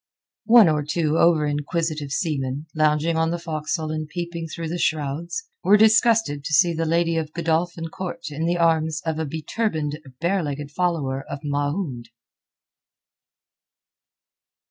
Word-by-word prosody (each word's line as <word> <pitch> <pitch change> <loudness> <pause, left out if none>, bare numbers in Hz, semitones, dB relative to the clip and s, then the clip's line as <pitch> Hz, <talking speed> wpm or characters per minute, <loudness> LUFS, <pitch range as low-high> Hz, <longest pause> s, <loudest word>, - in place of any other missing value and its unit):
One 230 -4 +8
or 155 -2 +2
two 155 +1 0
over 165 -3 +4
inquisitive 150 0 -2
seamen, 140 -2 -2
lounging 155 +1 +2
on 160 0 +2
the 175 - -1
forecastle 155 -1 -3
and 155 0 -3
peeping 170 0 -5
through 165 0 -5
the 175 +1 -3
shrouds, 160 - -1 0.2
were 210 - +6
disgusted 220 - +4
to 155 +2 -4
see 170 +3 +5
the 165 0 -1
lady 165 0 +1
of 155 -1 -3
Godolphin 165 0 -1
Court 170 -2 -6
in 160 +3 -2
the 175 +1 +1
arms 160 -2 +1
of 160 -1 -1
a 160 - -2
beturbaned 155 -1 -2 0.2
bare 185 +3 +1
legged 145 -1 -5
follower 150 -6 -1
of 140 - -5
Mahound. 145 -3 -2
160 Hz, 145 wpm, -23 LUFS, 150-170 Hz, 0.2 s, One